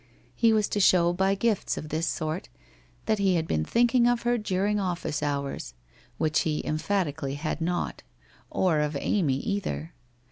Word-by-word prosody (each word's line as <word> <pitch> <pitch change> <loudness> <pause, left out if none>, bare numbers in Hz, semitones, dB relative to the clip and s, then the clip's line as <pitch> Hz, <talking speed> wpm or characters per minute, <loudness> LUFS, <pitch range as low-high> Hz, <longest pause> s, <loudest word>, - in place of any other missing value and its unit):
He 225 - +3
was 215 -2 +2
to 205 - -1
show 175 -3 +5
by 190 +2 +2
gifts 215 0 0
of 155 - -6
this 160 +2 -1
sort 155 - -3 0.3
' - - -32
that 215 - +1
he 195 -2 +3
had 165 -1 0
been 75 -1 0
thinking 240 - +3
of 245 -1 +1
her 240 0 +2
during 205 0 0
office 175 -5 -2
hours/ 140 - -3 0.4
which 155 -1 +1
he 155 -2 -1
emphatically 155 -4 -1
had 155 +2 -3
not, 175 +2 -2 0.5
or 175 -5 +2
of 150 -1 0
Amy 150 -9 +1
either. 180 -1 -3
170 Hz, 170 wpm, -27 LUFS, 150-205 Hz, 0.5 s, show